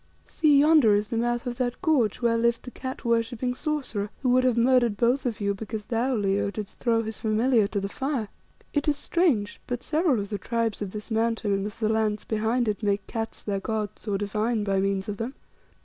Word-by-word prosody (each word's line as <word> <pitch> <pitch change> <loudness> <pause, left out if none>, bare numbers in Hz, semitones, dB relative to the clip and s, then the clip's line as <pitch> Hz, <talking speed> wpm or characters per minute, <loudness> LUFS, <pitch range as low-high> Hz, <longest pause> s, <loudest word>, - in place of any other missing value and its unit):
"See, 300 -3 +3
yonder 295 -8 +6
is 210 +1 0
the 230 - -2
mouth 240 +1 0
of 245 -1 -4
that 250 -1 -2
gorge 255 - +2
where 230 -1 +3
lived 235 0 +1
the 250 - -8
cat 260 0 -7
worshipping 235 +1 0
sorcerer, 255 -8 -3
who 255 - +2
would 255 +1 +4
have 250 -2 +2
murdered 240 -3 +3
both 250 +4 +2
of 230 - -3
you 200 -1 0
because 215 +1 -6
thou, 245 +3 0
Leo, 200 -1 +1
didst 210 0 -7
throw 230 -2 +2
his 220 -1 -6
familiar 220 0 +2
to 205 0 -2
the 195 - -2
fire. 265 0 -2 0.5
It 290 0 0
is 295 -1 +2
strange, 290 - 0
but 245 0 -3
several 305 -5 +2
of 200 0 -4
the 205 -2 -3
tribes 230 -2 -1
of 205 - -2
this 210 +3 -8
Mountain 225 -2 +1
and 195 +1 -1
of 210 - -9
the 220 -1 0
lands 215 -1 0
behind 225 +2 0
it 210 0 -1
make 200 -2 0
cats 225 -1 -5
their 200 -2 -1
gods 215 +1 -4
or 200 -1 +1
divine 210 +2 -1
by 195 -1 +1
means 195 0 0
of 205 -1 -4
them. 235 +5 -4
225 Hz, 220 wpm, -26 LUFS, 210-250 Hz, 0.5 s, yonder